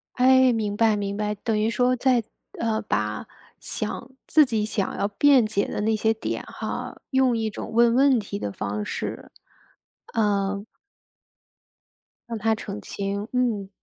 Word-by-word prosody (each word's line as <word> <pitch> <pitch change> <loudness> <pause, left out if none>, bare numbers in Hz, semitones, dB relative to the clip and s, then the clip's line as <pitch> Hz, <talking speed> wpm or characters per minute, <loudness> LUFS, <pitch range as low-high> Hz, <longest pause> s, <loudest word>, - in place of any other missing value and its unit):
哎， 260 0 +5
明 210 -2 -2
白 225 -1 +4
明 200 -1 -3
白， 210 0 -1
等 215 +1 -1
于 215 +1 +2
说 250 +2 +2
在 250 -2 +3 0.3
呃， 225 -1 0
把 105 - -2 0.3
想 240 - -4 0.2
自 305 -2 +6
己 225 -5 -1
想 210 -2 -2
要 200 - 0
辩 260 +3 +5
解 215 -2 0
的 - - -3
那 220 +1 +1
些 220 +1 +2
点 220 - -4
哈， - - -5
用 260 -3 +3
一 220 -1 -1
种 215 - -7
问 235 0 +5
问 270 +1 +5
题 205 -2 -4
的 - - -3
方 105 +1 -4
式， - - -5 0.9
嗯 200 -2 0 1.6
让 230 - -3
他 220 +1 +2
澄 210 -1 -6
清， 200 +1 -4
嗯。 230 -6 0
220 Hz, 165 characters per minute, -25 LUFS, 200-240 Hz, 1.6 s, 自